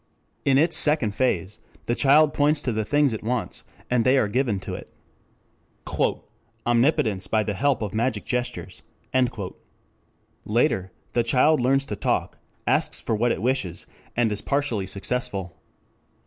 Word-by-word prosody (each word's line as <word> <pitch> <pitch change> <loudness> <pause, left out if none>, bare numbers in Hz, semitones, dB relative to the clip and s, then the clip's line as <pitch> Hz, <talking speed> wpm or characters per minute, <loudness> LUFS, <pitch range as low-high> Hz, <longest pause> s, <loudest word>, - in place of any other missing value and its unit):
In 135 -1 +4
its 160 +3 +3
second 145 -9 +3
phase 100 -5 -1 0.3
the 120 - 0
child 145 +4 +4
points 145 +1 +2
to 125 - 0
the 110 -1 -1
things 145 +2 +2
it 110 - -4
wants, 120 0 -2 0.2
and 125 -2 +2
they 130 +3 +4
are 120 - +3
given 120 -2 0
to - - -6
it. - - -8 1.8
"Omnipotence 115 - +2
by 110 +1 +1
the 105 - -2
help 135 +4 +1
of 105 - -4
magic 120 +4 -1
gestures." 125 0 -3 1.6
Later, 105 - +1 0.2
the 120 - +2
child 130 +6 +3
learns 135 +2 +2
to 105 - -4
talk, - - -1 0.3
asks - - +1
for - - -2
what 115 +3 +2
it - - -2
wishes, 120 -9 -1 0.3
and 115 -2 +2
is 105 0 -1
partially 140 -9 -1
successful. 100 -4 -3
120 Hz, 150 wpm, -24 LUFS, 105-135 Hz, 1.8 s, In